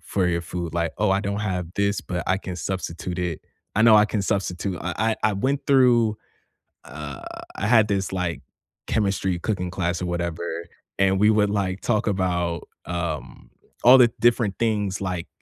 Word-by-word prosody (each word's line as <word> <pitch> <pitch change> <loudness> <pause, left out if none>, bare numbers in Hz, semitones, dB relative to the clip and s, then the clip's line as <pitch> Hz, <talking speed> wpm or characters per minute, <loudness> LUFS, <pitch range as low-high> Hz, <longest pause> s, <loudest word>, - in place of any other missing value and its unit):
for 95 -2 -1
your 85 -1 0
food? 85 -1 -5
Like, 85 -1 0
"Oh, 105 -2 +2
I 95 +1 +2
don't 100 0 -2
have 90 -4 -2
this, 100 0 +1
but 90 -2 -4
I 95 - +2
can 95 -2 -6
substitute 90 -1 -4
it 90 -3 -2 0.4
I 110 - +4
know 115 -1 +7
I 105 - +6
can 105 -1 -2
substitute." 95 -2 -2
I 90 0 -3 0.3
I - - +3
I - - -2
went 135 +7 -1
through 120 -5 +4 0.7
uh, 75 0 -8 0.3
I 105 - -2
had 110 -2 +5
this 100 -2 -1
like 90 -5 -2 0.5
chemistry 95 -4 0
cooking 90 -2 -2
class 90 -2 -2
or - - -1
whatever, 85 -1 -3 0.3
and 95 0 +3
we 105 - +6
would 105 -1 +3
like 100 -2 -1
talk 110 -2 0
about, 90 -4 -1 0.2
um, 85 -4 -5 0.3
all 125 +2 +9
the 120 -2 +6
different 115 -4 +2
things, 105 -4 0
like 90 -3 -3
95 Hz, 180 wpm, -24 LUFS, 85-105 Hz, 0.7 s, all